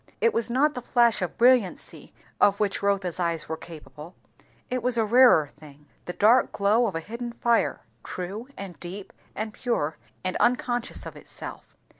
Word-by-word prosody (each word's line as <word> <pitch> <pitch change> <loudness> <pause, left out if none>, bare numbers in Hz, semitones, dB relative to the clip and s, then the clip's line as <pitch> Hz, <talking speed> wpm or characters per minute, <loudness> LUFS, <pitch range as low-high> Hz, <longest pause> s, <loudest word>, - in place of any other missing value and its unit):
It 460 - +3
was 230 +1 0
not 280 +5 +2
the 250 - -5
flash 235 -3 +3
of 180 - -3
brilliancy 240 -6 +2 0.3
of 200 0 +4
which 205 -2 0
Rotha's 195 -3 0
eyes 170 -2 -1
were 160 - -3
quite 160 - -11
capable; 160 0 -11 0.5
it 255 0 -2
was 245 0 +1
a 225 - +3
rarer 235 - +6
thing, 150 0 -16 0.2
the 180 - -5
dark 230 +7 +4
glow 215 +4 +2
of 190 - -4
a - - 0
hidden 235 +6 -6
fire, 235 0 +1 0.2
true, 195 +7 -6
and 185 -6 -8
deep, 185 +3 -8 0.2
and 215 +1 -4
pure, 160 - -2 0.3
and 185 0 -1
unconscious 245 0 0
of - - -8
itself. - - -9
210 Hz, 175 wpm, -26 LUFS, 175-240 Hz, 0.5 s, rarer